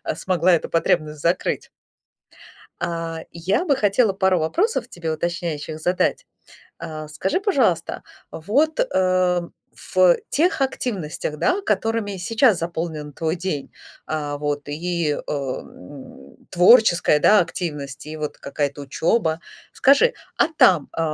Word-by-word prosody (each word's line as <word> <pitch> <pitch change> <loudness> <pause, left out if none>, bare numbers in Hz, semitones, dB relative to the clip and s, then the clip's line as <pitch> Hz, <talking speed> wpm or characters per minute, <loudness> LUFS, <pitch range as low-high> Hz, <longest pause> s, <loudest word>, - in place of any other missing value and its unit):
смогла 185 -1 +2
эту 165 - 0
потребность 155 -2 0
закрыть. 170 +4 -1 1.1
А, 165 -1 -3
я 190 - -1
бы 285 - +3
хотела 210 -2 +2
пару 190 -2 +2
вопросов 265 - 0
тебе 165 -2 -4
уточняющих 160 -1 -3
задать. 180 +3 0 0.5
А 155 -2 -7
скажи, 185 - -1
пожалуйста, 260 - 0 0.3
вот, 280 - 0
э, 185 - +2 0.5
в 185 -2 +6
тех 330 0 +1
активностях, 190 - -3
да, 380 +2 +1
которыми 225 - -1
сейчас 225 +2 +2
заполнен 160 -3 -4
твой 160 +3 -2
день, 170 -6 -4 0.3
э, 150 -2 -3
вот 145 0 -3
и, 165 0 -1
э, - - -5
м, 135 -2 -8
творческая, 180 -5 +5
да, 210 -2 +6
активность, 150 -6 -4
и 155 +1 -7
вот 150 -1 -4
какая-то 145 0 -3
учеба. 160 - 0 0.3
Скажи, 285 - +4 0.2
а - - +3
там, 170 -6 +5
э, - - -3
170 Hz, 120 wpm, -22 LUFS, 155-205 Hz, 1.1 s, в